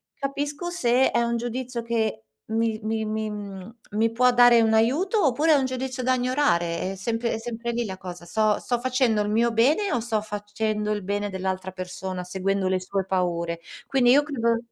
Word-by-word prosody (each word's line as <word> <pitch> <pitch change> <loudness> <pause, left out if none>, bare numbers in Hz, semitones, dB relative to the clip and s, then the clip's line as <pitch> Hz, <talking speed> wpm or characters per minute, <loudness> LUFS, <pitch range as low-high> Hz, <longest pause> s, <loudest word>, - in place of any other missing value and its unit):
capisco 290 +4 -3
se 260 -6 +2
è - - +2
un 235 0 0
giudizio 240 +1 -4
che 225 - -1 0.2
mi 225 0 0
mi 220 0 -1
mi 215 0 -2
mhmm, 205 0 -8 0.2
mi 220 +2 +1
può 250 +2 +4
dare 245 -1 +7
un 220 -1 +3
aiuto, 305 - +2
oppure 300 +5 +3
è - - +6
un 275 - +2
giudizio 260 0 -3
da 255 +1 +3
ignorare. 245 -10 0
È - - -6
sempre 225 +4 -2
è - - -3
sempre 235 +1 -4
lì 235 0 -1
la 190 -3 -6
cosa, 180 -2 -9
sto 215 +3 +1
sto 245 -1 -1
facendo 255 -4 +2
il 205 - -1
mio 230 +3 +2
bene 300 - +3
o 240 - 0
sto 225 -1 -1
facendo 210 0 -3
il 210 -2 -2
bene 205 +2 -2
dell'altra 190 0 -3
persona, 185 0 -5
seguendo 190 +1 -1
le 185 0 0
sue 190 +1 -2
paure? 170 -3 -1 0.3
Quindi 250 -3 +4
io 285 +3 +6
credo 235 -6 0
225 Hz, 195 wpm, -25 LUFS, 195-250 Hz, 0.3 s, dare